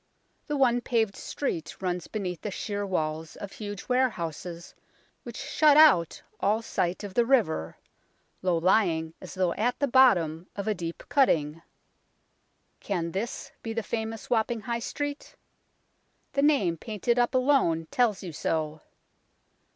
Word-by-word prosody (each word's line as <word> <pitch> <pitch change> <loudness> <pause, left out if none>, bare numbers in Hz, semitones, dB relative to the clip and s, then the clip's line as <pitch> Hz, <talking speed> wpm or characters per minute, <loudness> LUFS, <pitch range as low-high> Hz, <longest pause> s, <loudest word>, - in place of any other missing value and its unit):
The 295 - -1
one 245 -3 +3
paved 225 -5 0
street 165 - -4
runs 180 -2 -2
beneath 185 -6 -4
the 210 - -3
sheer 205 0 -3
walls 160 -3 -2
of 200 - -8
huge 205 -2 -7
warehouses 175 - -2 0.5
which - - -9
shut 300 -2 +4
out 275 - +5 0.2
all 215 +3 +1
sight 180 -2 -1
of 200 -2 -6
the 240 - +4
river, 215 - +1 0.6
low 180 -2 +1
lying 165 -3 +2
as 185 - -9
though 185 -2 +1
at 240 +4 0
the 285 - +1
bottom 180 - +4
of 200 +1 -4
a 215 - +2
deep 170 -3 -6
cutting. 165 - +2 1.2
Can 170 -4 -2
this 205 +7 -4
be 225 - -4
the 230 0 -2
famous 225 0 -4
Wapping 230 -1 0
High 235 +1 -2
Street? 290 +4 -5 1.0
The 275 - +1
name 270 - +3
painted 230 +5 -1
up 240 +1 +2
alone 255 - +3
tells 225 -6 +1
you 175 -3 -6
so. 155 0 -2
205 Hz, 145 wpm, -27 LUFS, 170-240 Hz, 1.2 s, out